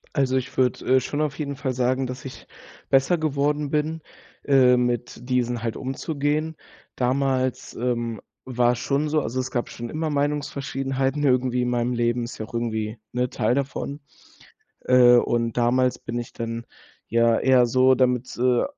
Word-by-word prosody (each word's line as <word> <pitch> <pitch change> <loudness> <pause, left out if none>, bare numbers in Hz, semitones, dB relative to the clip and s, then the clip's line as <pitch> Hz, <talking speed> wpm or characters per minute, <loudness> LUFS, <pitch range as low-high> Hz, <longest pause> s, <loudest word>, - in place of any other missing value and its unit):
Also, 130 -3 +1
ich 130 +2 -3
würde, 130 0 +2
äh, - - +5
schon 145 +4 -3
auf 150 -1 -2
jeden 140 -2 -3
Fall 135 -1 -2
sagen, 130 +1 0
dass 125 +2 -7
ich 130 - -9 0.4
besser 135 +6 +3
geworden 145 -1 0
bin, 155 +2 -1 0.4
äh, 130 -3 +5
mit 120 0 -2
diesen 120 -2 0
halt 115 - -2
umzugehen. 150 +3 -2 0.4
Damals, 130 0 0
ähm, 120 -2 -2 0.2
war's 120 -1 +1
schon 140 +3 0
so 155 0 +1
also, 130 -1 -3
es 130 0 -3
gab 120 - -2
schon 120 0 -7
immer 155 +2 -2
Meinungsverschiedenheiten 140 -1 -1
irgendwie 125 -2 +2
in 125 - 0
meinem 120 0 0
Leben, 120 0 0
ist 120 - -7
ja 110 - -3
auch - - -18
irgendwie, 110 -1 -2 0.2
ne, 125 0 0
Teil 125 - 0
davon. 140 +1 -3 0.8
Äh, 125 -1 +7
und 115 -1 0
damals 125 +1 +2
bin 120 - -5
ich 120 - -7
dann 115 0 -5 0.4
ja 115 0 +3
eher 130 -2 +4
so 130 +2 +4
damit, 125 -1 0
äh, 125 0 +2
130 Hz, 165 wpm, -24 LUFS, 120-140 Hz, 0.8 s, Äh